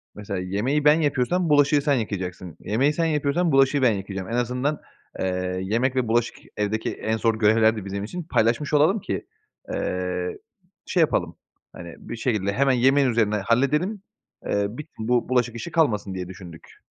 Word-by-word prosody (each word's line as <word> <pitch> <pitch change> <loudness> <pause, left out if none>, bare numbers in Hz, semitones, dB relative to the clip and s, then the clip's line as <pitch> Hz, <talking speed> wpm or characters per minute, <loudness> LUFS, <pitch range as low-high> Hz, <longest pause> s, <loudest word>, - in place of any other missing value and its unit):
"Mesela 100 -2 -5
yemeği 110 +11 -1
ben 150 +2 +6
yapıyorsam 155 +4 +1
bulaşığı 145 0 +4
sen 145 0 +2
yıkayacaksın. 95 - -4
Yemeği 135 +8 +1
sen 165 +2 0
yapıyorsam 155 +2 +1
bulaşığı 135 +1 +4
ben 125 - +5
yıkayacağım. 95 -1 -5
En 115 - -2
azından, 125 +5 -1 0.4
eee, 90 0 -2
yemek 120 +7 0
ve 130 -2 0
bulaşık 115 +1 +1 0.2
evdeki 105 +1 -1
en 110 0 -2
zor 115 0 +1
görevlerdi 110 -1 +3
bizim 100 +1 -4
için, 175 +11 -5
paylaşmış 130 -1 0
olalım 160 +8 +4
ki, - - -4 0.5
eee, 90 0 -2 0.5
şey 180 - +1
yapalım, 90 - +1 0.4
hani, 85 -2 -9
bir 120 - -7
şekilde 105 -4 -1
hemen 135 +4 +2
yemeğin 135 +2 +3
üzerine 110 -3 +1
halledelim, 140 - +1 0.4
eee, 100 0 0
bi 125 +8 -8
bu 120 +2 0
bulaşık 120 -2 +1
işi 165 +9 -6
kalmasın." 110 - +1
diye 90 -1 -5
düşündük. 90 -3 -12
115 Hz, 165 wpm, -24 LUFS, 100-145 Hz, 0.5 s, ben